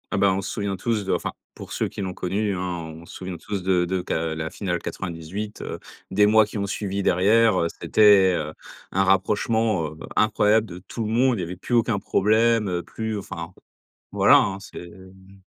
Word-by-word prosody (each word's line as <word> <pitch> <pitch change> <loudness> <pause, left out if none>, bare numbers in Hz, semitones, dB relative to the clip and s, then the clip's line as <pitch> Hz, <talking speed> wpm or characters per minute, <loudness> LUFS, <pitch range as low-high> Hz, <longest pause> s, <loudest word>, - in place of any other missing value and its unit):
Ah - - +1
bah, 100 -1 +4
on 95 - -1
se 95 - -5
souvient 100 -2 -2
tous 105 +2 -1
de 95 - 0
enfin - - -2 0.2
pour - - -10
ceux - - -1
qui - - -7
l'ont 95 -1 -3
connu 100 +3 -1
hein 90 - -4
on 85 -3 -5
se - - -13
souvient 90 -1 -6
tous 100 +2 -5
de 90 -1 +2
de 95 +1 -1
qu'à 80 -2 -2
la 80 0 -3
finale 90 -2 -3
98, 95 +5 -6
heu, - - -6 0.3
des 105 +2 +4
mois 110 +1 +5
qui 105 - -7
ont 100 0 -2
suivi 100 0 -3
derrière, 105 +3 +4
heu, 85 - +1
c'était, 100 -3 +5
heu, 75 -1 -3 0.4
un 95 +1 +2
rapprochement, 105 0 +1
heu, 75 +1 -10 0.2
incroyable 110 +1 +3
de 90 -2 -9
tout 110 +5 -6
le 105 - -3
monde 125 0 +3
il - - -3
y - - -2
avait 90 +2 -6
plus 110 +7 -2
aucun 115 -2 +2
problème 105 -2 +2
plus, 110 -1 -4
enfin, 85 -4 -7 0.6
voilà - - +6
hein, 95 -1 0
c'est 90 -2 -10
mmh. 95 +2 -16
95 Hz, 210 wpm, -24 LUFS, 90-105 Hz, 0.6 s, voilà